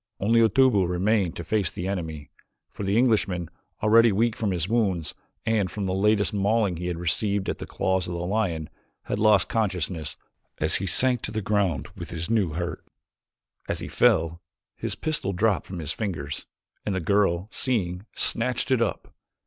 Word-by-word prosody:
Only 115 +4 +3
Otobu 115 -4 +4
remained 95 0 +1
to 85 - -5
face 105 -1 0
the 90 - -5
enemy, 80 -6 -4 0.4
for - - -9
the 100 +2 +1
Englishman, 100 -8 +2 0.3
already 115 +1 +6
weak 110 +3 +1
from 110 -4 -1
his 90 -2 -1
wounds 95 -9 0 0.3
and 110 -4 +1
from 100 +1 -4
the 95 - -1
latest 105 +2 +2
mauling 100 -2 +1
he 90 +1 -4
had 90 -2 -2
received 100 +3 0
at - - -2
the - - -6
claws 95 -1 0
of 85 - -4
the - - -3
lion, 90 -6 -1 0.3
had - - -3
lost 105 -2 +5
consciousness 90 -7 -1 0.4
as - - +1
he 95 - -3
sank 125 +5 +2
to - - -5
the 110 - -2
ground 95 -8 0
with 85 -4 -7
this 85 +4 -4
new 100 -9 +2
hurt. 85 +1 -4 0.9
As - - 0
he - - -6
fell 85 +1 +2 0.3
his - - -3
pistol 150 -11 -1
dropped 100 +2 +1
from 95 - -6
his 80 -3 -2
fingers, 85 -10 -4 0.4
and 100 - -2
the - - 0
girl, 95 0 +1
seeing, 100 -6 -1
snatched 125 +3 0
it 130 -3 +3
up. 105 -6 -2
100 Hz, 180 wpm, -25 LUFS, 85-110 Hz, 0.9 s, already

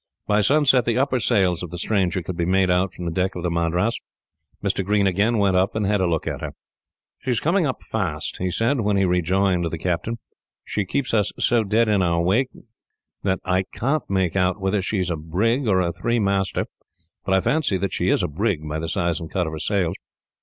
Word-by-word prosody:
By 105 0 +2
sunset, 135 +1 +4
the 120 0 +1
upper 130 -1 +1
sails 95 -8 +2
of 90 - -5
the 85 - -7
stranger 95 -2 0
could 90 +2 -5
be 85 - -1
made 95 0 +3
out 90 +1 +2
from 90 - -8
the 85 - -1
deck 90 +3 -1
of 90 - -5
the 90 - 0
Madras. 85 +6 0 0.6
Mr. - - 0
Green 100 +1 +2
again 100 +5 +2
went 100 -2 +2
up, 95 +3 +2
and 110 -2 0
had 105 +1 +1
a 90 - +2
look 80 -2 -1
at - - -4
her. - - -5 0.7
"She 130 - -6
is 120 - +2
coming 170 +1 +2
up 130 - -4
fast," - - -3
he 90 - -1
said, 115 +7 +1
when 105 -1 +1
he 95 - +3
rejoined 90 0 +1
the 80 - -4
captain. 90 +7 -2 0.5
"She 100 - -2
keeps 130 +7 -2 0.2
so 120 -2 +2
dead 110 +3 +2
in 105 -2 +2
our 85 -2 +1
wake 105 +10 +2 0.7
that 95 -2 0
I 90 +1 +2
can't 140 +6 -1
make 95 -3 0
out 95 +1 +1
whether 95 +1 0
she 100 +3 -2
is 90 -2 -1
a - - 0
brig 105 - 0
or 95 -3 +3
a 85 -1 -1
three 115 +7 -1
master; 100 -2 0 0.6
but 95 0 +1
I - - +4
fancy 120 -1 +1
that 95 +1 -2
she - - 0
is - - +2
a - - +1
brig, 85 -1 -1
by 75 +1 -3
the 80 0 -3
size 85 -2 0
and 80 -2 -7
cut 90 -2 -1
of 80 - -5
her 80 - -5
sails. 90 +1 0
95 Hz, 230 wpm, -23 LUFS, 90-110 Hz, 0.7 s, sunset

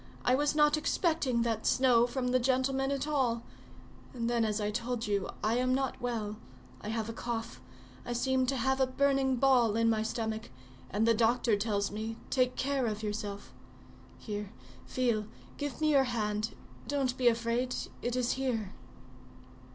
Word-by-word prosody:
I 250 - +4
was 290 +3 +2
not 300 0 +4
expecting 305 -7 +1
that 225 -2 -1
snow 245 -2 +4
from 250 0 -2
the 255 0 +3
gentleman 265 +1 +1
at 275 0 -1
all; 250 -6 +1 0.7
and 230 -1 -2
then 235 -1 +2
as 210 0 0
I 210 0 -1
told 235 +1 -2
you, 200 -2 -1
I 220 +3 +2
am 255 0 +2
not 270 -1 -2
well; 220 -4 -2 0.4
I - - -7
have 220 -1 -2
a 230 - -4
cough; 225 - -4 0.4
I 240 - -3
seem 260 +1 +1
to 270 - +1
have 265 +2 +1
a 260 - +4
burning 270 0 +2
ball 245 -4 +4
in 230 0 +3
my 220 -1 +1
stomach, 220 0 -3 0.4
and 215 +4 +1
the 230 - +6
doctor 230 0 +3
tells 205 -1 -1
me, 220 +2 -4
'Take 255 -2 +2
care 270 -2 0
of 215 0 -3
yourself.' 205 -1 -4 0.6
Here, 210 -2 -5 0.4
feel, 235 -5 0 0.3
give 290 -2 -4
me 310 -1 +3
your 275 -2 +5
hand; 215 -3 -2 0.3
don't 270 -3 0
be 255 -2 +1
afraid—it 240 +1 -1
is 250 -1 +1
here." 240 -7 -2
240 Hz, 165 wpm, -31 LUFS, 220-260 Hz, 0.7 s, the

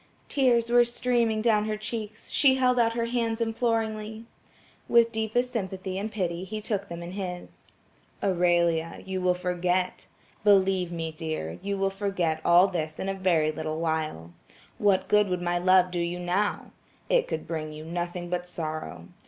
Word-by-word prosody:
The - - -7
tears 240 -4 +3
were 240 0 +7
streaming 235 -2 0
down 215 -3 +3
her 215 0 -2
cheeks, 215 0 -6
she 265 -2 +5
held 250 -1 +3
out 230 -1 +3
her 230 0 -1
hands 230 -1 -1
imploringly. 225 -1 -1 0.6
With 235 -1 +5
deepest 230 +3 -1
sympathy 190 -3 -3
and 215 +2 -4
pity 180 -4 -2
he 215 +3 -5
took 205 -2 -3
them 170 0 -6
in 170 - -7
his. 180 -2 -7 0.6
"Aurelia, 170 -3 +1
you 190 -1 -3
will 180 0 +2
forget. 180 0 -1 0.4
Believe 190 -3 +3
me, 165 -1 -3
dear, 155 - -5
you 200 0 -2
will 195 0 +1
forget 195 -5 -1
all 175 +3 +6
this 155 -4 -3
in 195 - -3
a - - 0
very 175 -5 +2
little 155 0 -4
while. 155 - -2 0.5
What 200 -2 +3
good 210 -1 +4
would 180 -1 -1
my 175 0 0
love 185 0 +4
do 175 - -2
you 170 +1 -2
now. 180 +4 -1 0.4
It - - +2
could - - -4
bring 155 -2 -4
you 155 +1 -9
nothing 175 +1 -4
but 180 0 -3
sorrow. 155 -2 -5
190 Hz, 170 wpm, -27 LUFS, 175-220 Hz, 0.6 s, were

